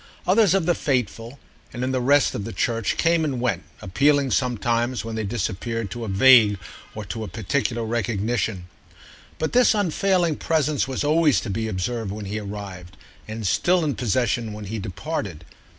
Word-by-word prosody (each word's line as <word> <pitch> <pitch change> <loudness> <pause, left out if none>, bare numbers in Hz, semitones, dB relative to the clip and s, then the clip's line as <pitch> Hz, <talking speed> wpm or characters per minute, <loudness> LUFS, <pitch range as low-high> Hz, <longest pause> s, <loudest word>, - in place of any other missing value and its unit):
Others 195 -1 +4
of 190 -4 +1
the 175 - +3
faithful, 125 -3 -2 0.3
and 120 - -5
in 130 - 0
the 130 -1 0
rest 140 +2 +3
of 105 - -4
the 115 - -5
church, 115 +2 -1
came 170 -1 +2
and 140 -5 -1
went, 125 0 0 0.2
appealing 140 +7 +2
sometimes, 120 0 0
when 115 - -5
they 110 0 -2
disappeared, 110 +1 -3
to 120 +4 -5
a - - -4
vague 105 0 +6 0.4
or 105 -1 -6
to 110 +4 -5
a - - -5
particular 115 +4 -2
recognition; 110 -3 -1 0.7
but 160 - -2
this 245 -2 +5
unfailing 185 -4 +1
presence 155 -4 0
was 130 +1 -2
always 155 -1 +3
to 110 - -5
be 110 +3 -2
observed 110 +2 -3
when 105 0 -6
he 105 +2 -3
arrived 100 -3 -8 0.3
and 110 0 -5
still 175 - +2
in 145 - 0
possession 115 0 0
when 105 0 -7
he 110 +3 -4
departed. 95 - -5
120 Hz, 175 wpm, -23 LUFS, 105-140 Hz, 0.7 s, vague